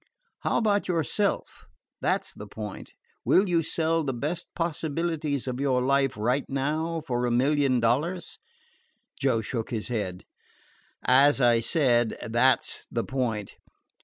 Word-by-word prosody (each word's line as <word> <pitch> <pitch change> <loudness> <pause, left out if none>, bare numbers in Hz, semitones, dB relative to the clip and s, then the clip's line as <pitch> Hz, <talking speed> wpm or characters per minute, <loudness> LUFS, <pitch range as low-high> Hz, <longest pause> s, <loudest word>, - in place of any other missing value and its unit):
How - - 0
about 205 -3 +1
yourself? 180 +4 -1 0.3
That - - +1
's - - -10
the 105 - -9
point. 105 -1 -8 0.3
Will 195 +2 +4
you 170 -2 +2
sell 165 +1 0
the 135 -3 -2
best 155 +8 -3
possibilities 160 -3 -2
of 125 0 -3
your 135 -2 +2
life 135 -1 +2
right 125 +6 +1
now 155 +4 -1
for 125 -4 0
a - - 0
million 135 +1 +2
dollars?" 150 +11 0 0.8
Joe 130 -5 +2
shook 115 +1 -4
his 110 -1 -4
head. 100 -6 -3 0.8
"As 140 +3 +5
I 120 -2 +4
said, 120 -2 +2
that 120 +3 +3
's - - -4
the 115 - -1
point. 120 -7 -2
135 Hz, 140 wpm, -27 LUFS, 120-160 Hz, 0.8 s, As